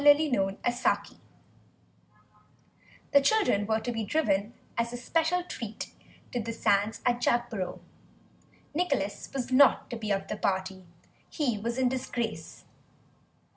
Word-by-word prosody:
THE 290 0 +9 0.2
LUMBER 195 -3 +1
ROOM 240 +1 0 1.9
The 280 - +7
children 275 - +3
were 220 0 +2
to 245 - -2
be 225 -1 -2
driven, 210 -4 0 0.2
as 235 0 0
a 245 - -4
special 330 +7 +1
treat, 230 - -6 0.4
to 245 - -1
the 230 +1 -4
sands 205 -1 +1
at 245 -1 +2
Jagborough. 240 -7 0 0.9
Nicholas 275 - -1
was 260 -2 -3
not 265 -1 +5
to 235 - -3
be 215 -2 -4
of 195 -1 0
the 210 - -4
party; 190 -1 -1 0.4
he 250 -9 -1
was 235 +3 -3
in 260 -1 +3
disgrace. 240 -8 -4
235 Hz, 135 wpm, -29 LUFS, 205-260 Hz, 1.9 s, THE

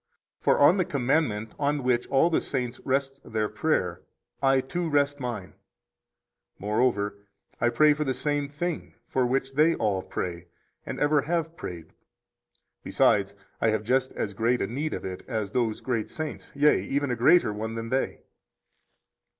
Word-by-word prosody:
For - - +3
on 155 +7 +6
the 185 - +3
commandment 125 -7 0
on 145 -1 0
which 125 -1 +1
all 150 +6 +3
the - - +2
saints 125 -3 -3
rest 135 +1 -1
their 110 -1 -1
prayer 105 - -1 0.4
I, 135 -1 +4
too, 170 +6 -3
rest 145 -1 +2
mine. 120 -7 -5 1.0
Moreover, 105 -1 0 0.4
I 120 - +3
pray 150 +4 +5
for 150 +1 -2
the 135 -3 -1
same 145 -1 -1
thing 165 +3 -4
for 130 -2 +1
which 135 +1 -1
they 155 +4 +4
all 100 -4 0
pray 90 -2 -5 0.4
and - - -4
ever 145 0 +3
have 165 +1 -2
prayed; 85 - -8 0.9
besides, - - +2 0.3
I 110 - +4
have 110 -1 0
just 130 +3 +1
as 100 - -3
great 115 +4 +1
a - - 0
need 140 +9 -3
of - - -6
it 95 -1 -6
as 110 -5 -2
those 115 -3 0
great 120 -4 -2
saints, 155 -1 -6
yea, 145 +1 +4
even 140 -1 -1
a - - +1
greater 120 -1 +4
one 110 +2 -4
than 115 0 -4
they. 130 +2 -1
130 Hz, 165 wpm, -27 LUFS, 110-145 Hz, 1.0 s, on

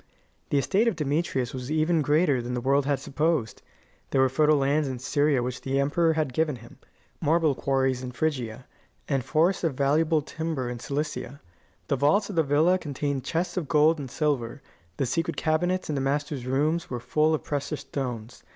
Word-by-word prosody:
The 145 - +1
estate 200 - +2
of 230 - +1
Demetrius 145 -4 -1
was 130 0 -6
even 155 +1 +2
greater 145 -2 +2
than 125 +1 -4
the - - -1
world 135 +2 +2
had 140 -2 +1
supposed. 150 -5 -1 0.5
There 135 - +1
were 130 - +4
fertile 150 +3 +3
lands 140 +2 +1
in 130 -1 -3
Syria 140 +1 +1
which 125 0 -4
the 135 +1 -1
emperor 160 +4 +2
had 155 -5 -1
given 155 0 +1
him, 115 -1 -14 0.4
marble 160 -1 +3
quarries 130 -1 0
in 125 -1 -5
Phrygia, 125 -4 -2 0.4
and 135 -3 0
forests 170 +8 +1
of 160 -6 0
valuable 150 +3 +2
timber 155 -5 -3
in 120 - -6
Cilicia; 145 0 -4 0.5
the 140 - +1
vaults 180 +10 +2
of - - -7
the 165 - +4
villa 160 +5 +3
contained 140 -3 -3
chests 170 +4 -2
of 170 -5 -2
gold 155 +2 +4
and 135 -3 -6
silver; 140 -3 -2 0.3
the 135 - 0
secret 165 +7 -1
cabinets 175 +4 0
in 155 - -2
the 140 - -1
master's 140 -1 -2
room 150 +6 +1
were 125 - -3
full 155 +6 +2
of - - -6
precious 145 +1 -3
stones. 120 -4 -5
145 Hz, 190 wpm, -26 LUFS, 130-155 Hz, 0.5 s, were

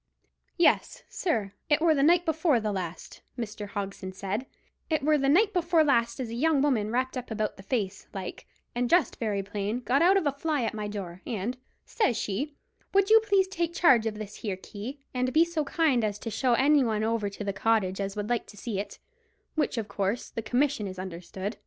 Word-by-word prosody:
"Yes, 345 - +2
sir, 220 - -1 0.2
it 295 0 +4
were 325 0 +4
the 280 - +1
night 345 +4 +5
before 320 -5 +2
the 215 -1 -2
last," 180 -4 -6 0.2
Mr. 210 -3 -5
Hogson 195 -2 -5
said; 200 +7 -3 0.4
"it 310 -4 +1
were 305 +1 +4
the 275 0 +2
night 410 +8 +4
before 340 -3 +3
last 235 -5 +2
as 250 -3 -3
a - - -6
young 295 +4 +2
woman 235 -8 +1
wrapped 255 +3 -1
up 255 -1 -5
about 215 -1 -2
the - - -12
face 200 -2 -3
like, 190 -2 -7 0.3
and 245 0 0
dressed 340 -7 +3
very 205 -4 -1
plain, 205 +4 -3
got 260 +3 +2
out 370 +3 +6
of 385 - 0
a 285 - +3
fly 285 -1 -1
at 225 - -1
my 210 -1 -4
door; 190 -4 -6
and, 230 +1 -2 0.3
says 255 - +1
she, 270 +9 -3 0.4
'Would 395 +1 +4
you 445 - +9
please 400 -3 +2
take 340 -3 -2
charge 245 -11 +5
of 215 - -3
this 210 -1 -7
here 200 -4 -3
key, 225 +9 -8
and 255 0 0
be 320 +3 +5
so 340 -2 -1
kind 275 -5 +2
as 205 -1 -1
to 225 +2 -6
show 250 +2 +1
any 285 +2 +4
one 215 -3 0
over 220 -2 0
the 200 0 -4
cottage 200 -3 +1
as 195 +1 -3
would 210 0 -3
like 240 -1 -1
to 205 - -14
see 205 -1 -3
it, 200 0 -6 0.6
which 305 -5 0
of 220 -2 -2
course 200 +4 -2
the 225 - -4
commission 245 -2 0
is 185 -1 -7
understood? 185 +3 -6
235 Hz, 215 wpm, -28 LUFS, 205-295 Hz, 0.6 s, you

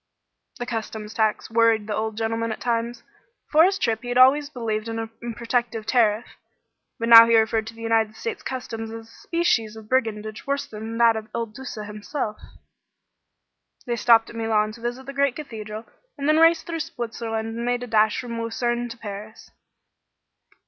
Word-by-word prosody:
This 245 - -5
customs 220 -2 -5
tax 220 0 0
worried 225 -2 +3
the 210 - -3
old 220 0 -3
gentleman 225 0 -1
at 220 - -5
times. 235 0 -2 0.4
Before 315 +2 +5
this 385 +1 +2
trip 225 - 0
he 245 - -7
had 245 - 0
always 280 +3 +6
believed 230 -5 -3
in 225 - -4
a 225 - -2 0.3
protective 235 -2 -1
tariff, 225 -2 +2 0.7
but 230 -2 -2
now 230 0 +11
he 230 -1 +5
referred 220 0 +1
to 230 - -8
the 230 - -10
United 225 -1 +1
States 455 - -5
customs 230 -4 -5
as 225 0 -8
a - - -19
species 230 -11 0
of 220 -1 -11
brigandage 220 -3 -1
worse 280 0 -1
than 225 -2 -7
that 230 -1 +5
of 220 0 -6
Il 230 - -1
Duca 225 -1 -8
himself. 210 +2 -5 1.5
They 240 - -1
stopped 230 -1 +4
at - - -13
Milan 220 -2 +1
to 230 +2 -13
visit 240 +2 -4
the 275 - -7
great 280 -2 +1
cathedral, 220 -6 -7 0.3
and 280 0 -2
then 305 +1 +4
raced 330 0 +5
through 335 -1 -4
Switzerland 230 -7 -4
and 235 - -4
made 245 0 -1
a - - -6
dash 220 -2 +3
from 235 -2 -5
Luzerne 240 +1 -1
to 230 - -8
Paris. 210 0 -9
230 Hz, 185 wpm, -24 LUFS, 220-245 Hz, 1.5 s, now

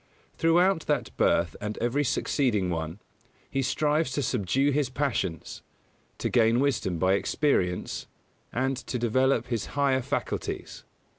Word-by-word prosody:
Throughout 170 +1 +3
that - - -1
birth 85 0 +2
and 105 0 -4
every 125 +5 0
succeeding 115 -8 +1
one, 80 +2 -4 0.5
he 135 - 0
strives 150 +2 +1
to 145 - -1
subdue 130 +5 +1
his 140 -2 +1
passions, 115 - -2 0.6
to - - -2
gain 115 0 +3
wisdom 130 -10 0
by 95 +3 +3
experience, 95 -5 0 0.4
and 135 +2 0
to 125 - -4
develop 125 +1 +1
his 115 -4 -2
higher 135 -2 +3
faculties. - - -4
125 Hz, 130 wpm, -27 LUFS, 105-140 Hz, 0.6 s, Throughout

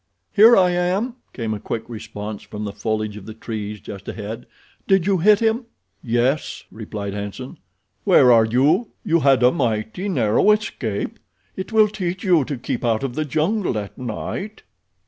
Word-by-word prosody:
"Here 225 +3 +8
I 180 -2 +5
am," 185 +8 0
came 115 -3 -3
a 105 - -4
quick 115 +2 -5
response 110 -2 -7
from 105 0 -7
the 100 - -3
foliage 110 0 -2
of 100 - -11
the 110 - -8
trees 105 -2 -5
just 100 -1 -10
ahead. 110 +2 -6 0.4
"Did 195 -3 +3
you 195 -2 +2
hit 210 +5 +5
him?" 230 +2 +1 0.4
"Yes," 120 +5 0
replied 105 -2 -6
Hanson. 105 +6 -6 0.4
"Where 125 - +6
are 115 -2 +6
you? 145 - +2
You 170 +1 +3
had 135 -3 +4
a 125 - +6
mighty 120 - -1
narrow 120 - +2
escape. 120 - -3 0.4
It 190 - -6
will 220 -1 +5
teach 185 -3 -4
you 175 -7 +4
to 140 - -4
keep 120 - -4
out 115 -1 +1
of 135 -3 -2
the 155 +2 -2
jungle 160 - 0
at 100 -1 -5
night." 190 - -5
125 Hz, 170 wpm, -21 LUFS, -, 0.4 s, Here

